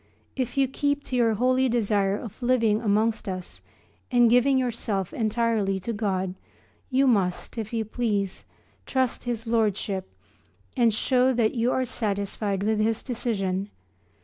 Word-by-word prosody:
If 255 Hz, -1 st, -3 dB
you 270 Hz, -1 st, +4 dB
keep 285 Hz, +2 st, -1 dB
to 255 Hz, -, -4 dB
your 230 Hz, -3 st, +3 dB
holy 255 Hz, +3 st, +2 dB
desire 205 Hz, -4 st, +1 dB
of 230 Hz, +2 st, -9 dB
living 230 Hz, -3 st, +2 dB
amongst 215 Hz, 0 st, +1 dB
us 185 Hz, -1 st, -7 dB, 0.5 s
and 240 Hz, -2 st, +4 dB
giving 250 Hz, +3 st, +4 dB
yourself 225 Hz, -7 st, -2 dB
entirely 220 Hz, -3 st, 0 dB
to 230 Hz, +5 st, -4 dB
God 190 Hz, -3 st, -1 dB, 0.6 s
you 270 Hz, +1 st, +3 dB
must, 195 Hz, -8 st, +1 dB
if 220 Hz, -2 st, -4 dB
you 225 Hz, -2 st, -1 dB
please, 210 Hz, -4 st, -2 dB, 0.4 s
trust 260 Hz, -2 st, 0 dB
his 235 Hz, -2 st, -3 dB
Lordship 210 Hz, -4 st, 0 dB, 0.7 s
and 235 Hz, -3 st, +4 dB
show 255 Hz, +4 st, +2 dB
that 230 Hz, -3 st, +2 dB
you 240 Hz, +1 st, +1 dB
are 260 Hz, -, +1 dB
satisfied 200 Hz, -3 st, -2 dB
with 215 Hz, 0 st, +1 dB
his 225 Hz, +1 st, 0 dB
decision. 200 Hz, -6 st, -2 dB
225 Hz, 145 wpm, -26 LUFS, 200-245 Hz, 0.7 s, you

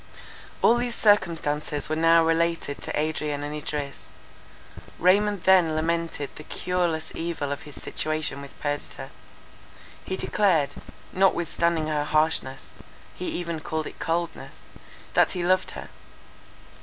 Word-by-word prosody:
All 235 Hz, -, +6 dB
these 240 Hz, -1 st, -1 dB
circumstances 160 Hz, -8 st, +2 dB
were 155 Hz, -, -1 dB
now 165 Hz, +1 st, +5 dB
related 165 Hz, -3 st, 0 dB
to -, -, -2 dB
Adrian 150 Hz, -1 st, -1 dB
and 145 Hz, +1 st, -4 dB
Idris. 145 Hz, -2 st, -5 dB, 0.9 s
Raymond 200 Hz, +2 st, +3 dB
then 180 Hz, -4 st, +5 dB
lamented 165 Hz, -2 st, -1 dB
the 155 Hz, -, -9 dB
cureless 175 Hz, -2 st, -1 dB
evil 165 Hz, -4 st, -3 dB
of 145 Hz, -, -3 dB
his 145 Hz, -, -10 dB
situation 155 Hz, -3 st, -2 dB
with 140 Hz, -, -12 dB
Perdita. 145 Hz, 0 st, -4 dB, 0.9 s
He 190 Hz, -, -3 dB
declared, 175 Hz, -9 st, +2 dB, 0.4 s
notwithstanding 170 Hz, -3 st, +2 dB
her 150 Hz, -1 st, 0 dB
harshness, 155 Hz, -3 st, 0 dB, 0.4 s
he 180 Hz, -, -5 dB
even 170 Hz, -2 st, -3 dB
called 155 Hz, +1 st, -3 dB
it -, -, -9 dB
coldness, 170 Hz, +1 st, -3 dB, 0.5 s
that -, -, +4 dB
he 180 Hz, -2 st, -2 dB
loved 185 Hz, +1 st, +3 dB
her. -, -, -8 dB
165 Hz, 125 wpm, -26 LUFS, 150-175 Hz, 0.9 s, All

